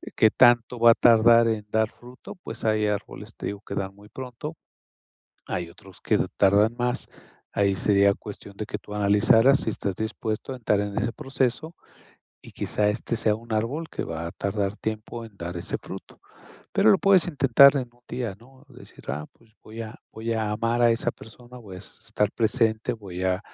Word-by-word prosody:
¿que 110 - +5
tanto 120 0 +4
va 115 0 +8
a - - +4
tardar 115 0 +6
en 105 -2 -3
dar 110 0 +1
fruto? 125 +1 -12
Pues 180 - -8
hay 110 -1 +2
árboles, 105 +1 -4
te - - -7
digo 100 0 -5
que - - -7
dan 95 -1 -3
muy 105 +1 -17
pronto. 130 +6 -7 0.9
Hay 85 -1 -4
otros 95 +2 -16
que - - +2 0.2
tardan 100 +3 +4
más. 125 0 -1 0.4
Ahí 100 -1 +1
sería 100 +1 +4
cuestión 100 -1 -10
de 105 - -4
que - - -4
tú - - -13
analizaras 105 +6 +4
si - - -1
estás 100 -2 -3
dispuesto 110 +2 -4
a 130 - -6
entrar 105 -4 +1
en 100 0 -3
ese 115 +1 -1
proceso, 135 +3 -2 0.7
y - - -13
quizá 105 -1 -1
este 115 +2 -2
sea 110 -2 +2
un 115 +1 -12
árbol 130 +10 -2
que - - -4
va 80 0 -5
a - - -7
tardar 100 0 -2
tiempo 110 +2 -5
en 110 -3 -15
dar 85 +1 -5
ese 85 - -4
fruto. - - -11 0.5
Pero 110 - +5
lo - - +5
puedes 195 -3 +4
intentar 140 -2 +6
en 130 -3 -2
un 120 - -28
día, 120 -6 -4
¿no?, 130 +3 -19
decir: 125 -2 -15
"Ah, 75 +3 -3
pues 110 -2 -27
voy 110 +1 -8
a 110 0 -8 0.2
voy 115 +1 -3
a 110 -2 -1
amar 115 +3 0
a 120 - +6
esa 115 - 0
persona, 120 +2 -14
voy 100 -6 -10
a - - -8
estar 105 +1 -3
presente, 110 0 +1
voy 95 -6 -7
a 95 0 +1
110 Hz, 195 wpm, -25 LUFS, 105-120 Hz, 0.9 s, va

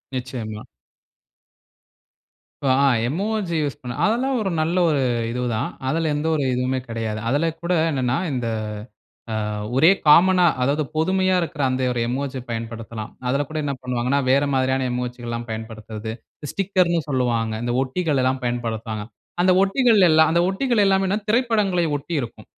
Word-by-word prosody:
நிச்சயமா. 120 -4 -5 2.0
இப்போ 135 - +2
அ - - +4 0.2
emoji 195 - -2
use 145 -5 -2
பண்ண 125 -1 -6
அதெல்லாம் 250 +5 +1
ஒரு 200 - -1
நல்ல 160 +3 0
ஒரு 150 -3 +1 0.3
இது 125 +2 -3
தான். 110 +5 -1 0.2
அதில 160 +3 0
எந்த 150 +2 -1
ஒரு 145 - 0
இதுவுமே 130 +1 0
கிடையாது. 115 -2 -3
அதில 145 +6 +1
கூட 170 +1 0 0.2
என்னன்னா, 130 -2 0 0.2
இந்த 125 -2 -2 1.1
அ - - -4 0.2
ஒரே 160 +6 +7 0.2
காமனா 180 +4 +6 0.2
அதாவது 140 +4 +1
பொதுமையா 185 +3 +2
இருக்கற 160 -3 -4
அந்த 130 0 -1
ஒரு 120 - -2
எமோஜி 130 +2 -3
பயன்படுத்தலாம். 115 -1 -6 0.2
அதில 140 +3 +1
கூட 155 - -5
என்ன 140 -1 -1
பண்ணுவாங்கன்னா 125 +2 0
வேற 140 +2 +4
மாதிரியான 130 0 +1
எமோஜிகள் 125 -1 -4
எல்லாம் 115 0 -4
பயன்படுத்துவது, 110 0 -6 0.4
ஸ்டிக்கர்ன்னு 185 -3 +1
சொல்லுவாங்க. 120 -4 0
இந்த 120 0 -1
ஒட்டிகள் 140 +1 -1
எல்லாம் 130 +1 0
பயன்படுத்துவாங்க. 115 -3 -3 0.4
அந்த 185 - +5
ஒட்டிகள் 225 +1 +3
எல்லாம் 160 0 +5
அந்த 170 +1 +3
ஒட்டிகள் 225 +2 +1
எல்லாமே 195 0 +2
திரைப்படங்கள 215 -6 +2 0.2
ஒட்டி 155 +5 -7
இருக்கும். 120 - -8
135 Hz, 145 wpm, -22 LUFS, 120-175 Hz, 2.0 s, ஒரே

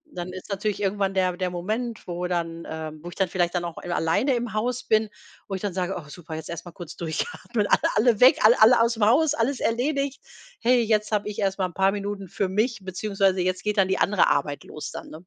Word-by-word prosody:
dann 180 +1 -5
ist 185 +3 -9
natürlich 205 +1 -2
irgendwann 195 -1 0
der 185 -1 +1
der 185 -1 -1
Moment, 215 +7 -4
wo 175 0 -3
dann, 170 -1 -3
ähm 155 -1 -6
wo 175 - -6
ich - - -12
dann 190 -3 0
vielleicht 175 -1 0
dann 175 -1 0
auch 170 - -6
alleine 180 - 0
im 235 -2 -3
Haus 245 +3 -1
bin, 220 -1 +2 0.4
wo 195 - -3
ich 190 - -5
dann 205 -4 -2
sage: 185 0 -2
„Oh, 150 -4 -9
super, 160 -1 -8
jetzt 160 - -7
erst 170 +1 -6
mal 175 - -9
kurz 175 -3 -9
durchatmen, 205 - -2
alle - - +4 0.2
alle 220 0 +3
weg, 255 - +7
alle 220 +2 +6
alle 230 +2 +7
ausm 230 -2 +1
Haus, 285 +7 +4
alles 260 0 0
erledigt. 275 +3 -1 0.4
Hey, 245 +1 +4
jetzt 215 -1 +1
habe 210 -1 0
ich 205 - -6
erst 195 -1 0
mal 185 - +2
'n 175 - -13
paar 195 +1 +3
Minuten 200 -1 -4
für 195 0 -1
mich 220 +4 0
beziehungsweise 195 0 0
jetzt 185 0 -1
geht 210 0 -1
dann 195 -1 +4
die 190 - +1
andere 200 -3 +3
Arbeit 145 0 0
los 150 - -7
dann“, - - -8
ne? - - -15
195 Hz, 240 wpm, -25 LUFS, 175-220 Hz, 0.4 s, weg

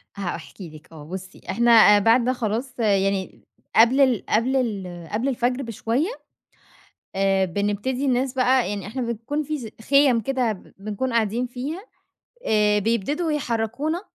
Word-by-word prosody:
هاحكي 180 -1 -6
لِك، 155 +2 -14
آه 155 -2 -11
بُصي 190 +3 -9
إحنا 225 -2 +6
بعد 230 +4 +4
ده 255 - +2
خلاص 240 +2 -3
يعني، 195 -3 0 0.3
قبل 235 +5 +5
ال 255 -5 +2
قبل 240 +5 +1
ال 190 -9 -3
قبل 225 +5 -1
الفجر 250 +1 -1
بشوية 230 - -1 1.1
آآ، 195 0 +2
بنبتدي 205 +8 -2
الناس 255 0 0
بقى 255 -2 +2
يعني 200 -1 -4
إحنا 255 +5 -4
بنكون 235 +6 -3
في 305 +1 -4
زي 230 -5 -8 0.2
خِيَم 275 -4 +5
كده 250 -1 0
ب 190 - -13
بنكون 215 +5 -3
قاعدين 230 +2 0
فيها، 265 +8 -5 0.7
آآ، 210 -1 +3
بيبتدوا 235 - -1
يحرّكونا 270 +4 -2
230 Hz, 145 wpm, -23 LUFS, 205-260 Hz, 1.1 s, إحنا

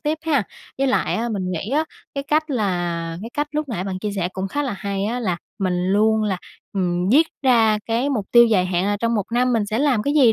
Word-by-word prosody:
tiếp 305 0 -1
ha. 300 -7 +2 0.4
Với 275 - +2
lại 260 - +1
á, 235 +2 -1
mình 190 -5 -2
nghĩ 180 +5 -4
á 305 +3 +2 0.3
cái 275 0 -3
cách 310 +2 +1
là 175 -8 -1
cái 230 - -7
cách 295 0 -1
lúc 300 -1 -2
nãy 200 -7 -3
bạn 190 -1 -3
chia 210 +1 -3
sẻ 180 -2 0
cũng 190 +1 -3
khá 290 +6 -1
là 260 -5 -2
hay 200 0 -2
á 235 +4 -2
là, 185 -7 0 0.2
mình 180 -2 0
luôn 220 +1 +3
là, 200 -3 0 0.4
ừm, 180 -2 0
viết 295 +9 +5 0.2
ra 225 -5 +4
cái 240 +5 0
mục 215 -7 -1
tiêu 235 0 +8
dài 195 -5 +2
hạn 180 0 0
là 205 - +1
trong 230 +2 0
một 205 -4 0
năm 250 +1 +2
mình 220 -3 +1
sẽ 215 +2 -1
làm 265 -6 +2
cái 285 +4 0
gì, 260 -7 +6
220 Hz, 255 wpm, -22 LUFS, 190-260 Hz, 0.4 s, tiêu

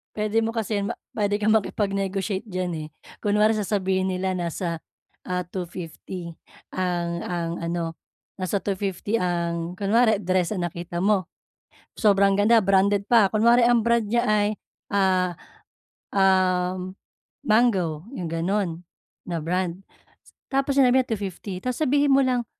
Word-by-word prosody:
Puwede 215 +1 +1
mo 225 - -1
kasi 225 -2 -2
yan 200 0 -1
ma - - -9 0.2
puwede 205 -1 0
kang 215 +1 +4
makipag-negotiate 195 -1 -1
diyan, 185 -4 -3
eh, - - -9 0.4
kunwari 210 +1 +3
sasabihin 190 -2 0
nila 185 0 -1
nasa, 170 0 -3 0.5
ah, 180 0 -2
250 175 -1 -7 0.3
ang 175 -2 -2
ang 170 -2 -2
ano 165 -1 -3 0.4
nasa 190 +1 -1
250 200 +2 -2
ang 170 -3 -1
kunware 215 +3 +2
dress 185 -1 0
ang 180 -4 -1
nakita 170 +1 -6
mo, 195 0 +2 0.7
sobrang 200 -2 +4
ganda 215 +3 +5
branded 200 0 +2
pa, 225 -5 +5
kunware 235 +3 +4
ang 235 -1 +3
brand 235 -1 +3
niya 235 +3 +1
ay, 210 -1 +3 0.4
ah, 190 -2 +2 0.8
um, 185 -1 +1 0.5
Mango, 190 -9 +2
'yong 175 -3 -4
gano'n 175 0 -1 0.4
na 170 -2 -3
brand. 180 +1 -1 0.8
Tapos 275 +1 +1
sinabi 260 0 +5
niya - - -26
250, 195 -1 -6
tapos 250 +2 -2
sabihin 290 0 +3
mo 275 - +5
lang, 250 -2 0
195 Hz, 135 wpm, -24 LUFS, 180-215 Hz, 0.8 s, ganda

